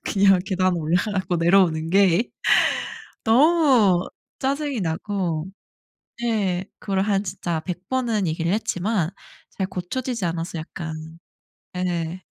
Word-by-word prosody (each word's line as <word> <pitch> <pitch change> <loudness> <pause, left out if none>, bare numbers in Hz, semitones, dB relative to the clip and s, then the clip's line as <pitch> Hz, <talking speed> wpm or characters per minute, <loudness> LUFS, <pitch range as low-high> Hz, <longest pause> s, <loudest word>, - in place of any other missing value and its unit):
그냥 195 -2 +4
계단 185 -1 +1
올라가고 180 +3 0
내려오는 165 -2 +3
게 195 +3 +3 0.9
너무 245 - +4 0.3
짜증이 280 -2 -1
나고 170 -1 -2 0.8
네. 195 -6 0
그걸 195 -2 -1
한 200 -1 +1
진짜 175 -3 -3
100 180 +2 -7
번은 235 -6 0
얘기를 165 +2 -1
했지만 200 -4 0 0.4
잘 190 - -3
고쳐지지 200 +5 -4
않아서 165 0 -3
약간 160 0 -6 0.8
예. 180 -1 -2
185 Hz, 220 characters per minute, -23 LUFS, 170-215 Hz, 0.9 s, 그냥